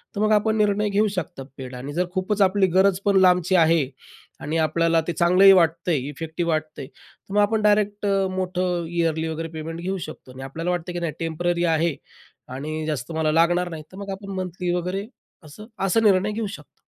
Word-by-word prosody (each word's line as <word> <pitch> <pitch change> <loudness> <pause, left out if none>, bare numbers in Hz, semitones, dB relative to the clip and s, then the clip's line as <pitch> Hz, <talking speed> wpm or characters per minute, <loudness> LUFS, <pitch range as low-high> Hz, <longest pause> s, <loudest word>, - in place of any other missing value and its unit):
तर 205 - -2
मग 215 0 +2
आपण 220 +1 +2
निर्णय 210 0 +2
घेऊ 205 +2 +2
शकतात 145 -6 -5
पेड 130 -1 -8
आणि 135 +4 -7
जर 180 +3 0
खूपच 195 +2 -1
आपली 195 0 +4
गरज 190 -1 +4
पण 200 -1 +3
लांबची 180 0 +4
आहे 165 -3 +4 0.5
आणि 155 +3 -3
आपल्याला 165 +1 +2
ते 175 - -1
चांगलंही 180 +4 +6
वाटतं 170 -1 +2
आहे, 150 - +2
इफेक्टिव्ह 165 +3 -3
वाटतं 155 -1 -3
आहे, 130 - -7
तर 195 - -17
मग 205 - +4
आपण 215 +1 +1
डायरेक्ट 205 0 +2
अ, 195 -1 +2
मोठं 180 -2 -1
ईयरली 165 -2 0
वगैरे 160 +1 -4
पेमेंट 165 +1 -6
घेऊ 190 +2 -2
शकतो. 155 -4 -11
आणि 130 - -10
आपल्याला 165 +6 -3
वाटतं, 175 0 -3
की 175 - -3
नाही 170 -3 -3
टेम्पररी 170 +1 -1
आहे 160 -1 0 0.6
आणि 155 +3 -4
जास्त 145 -2 -3
मला 160 -1 0
लागणार 175 +2 +2
नाही, 160 -2 -7
तर 185 - -12
मग 200 0 -7
आपण 200 -1 -9
मंथली 180 -1 -3
वगैरे 180 +3 -3 0.4
असं 155 +8 -12 0.2
असा 195 +4 +2
निर्णय 200 0 +3
घेऊ 215 0 -3
शकतो. - - -20
175 Hz, 200 wpm, -23 LUFS, 160-195 Hz, 0.6 s, चांगलंही